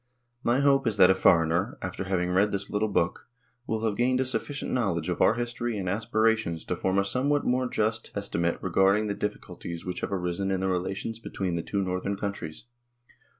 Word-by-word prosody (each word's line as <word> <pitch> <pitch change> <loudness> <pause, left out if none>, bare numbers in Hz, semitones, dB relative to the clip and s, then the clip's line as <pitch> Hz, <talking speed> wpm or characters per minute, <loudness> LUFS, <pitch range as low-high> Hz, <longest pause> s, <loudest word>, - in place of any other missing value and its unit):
My 120 +4 +2
hope 140 -2 +3
is 105 -3 0
that 95 -1 +8
a - - +6
foreigner, 85 +3 +3
after 90 +1 -4
having 90 -2 0
read 100 +3 +3
this 100 0 -3
little 105 +1 +1
book, 95 -3 -1 0.4
will 110 0 -1
have 105 -2 0
gained 125 +2 +2
a 130 - +2
sufficient 135 +2 -2
knowledge 95 -9 0
of 90 - -2
our 110 - +5
history 120 -1 -2
and 95 -2 -3
aspirations 110 -3 +1
to - - -1
form 95 +1 0
a 100 - +3
somewhat 140 +7 +1
more 125 +1 +1
just 110 0 -1
esti 100 -3 -3
mate 85 0 0
regarding 100 +3 +3
the 105 - -1
difficulties 90 -5 -5
which 90 -1 -3
have - - -3
arisen 90 0 -1
in 95 -1 0
the 95 - 0
relations 95 +5 -2
between 95 -5 -3
the 85 - -1
two 100 +3 -2
Northern 90 +2 -2
countries. 100 -3 -5
100 Hz, 200 wpm, -27 LUFS, 90-115 Hz, 0.4 s, that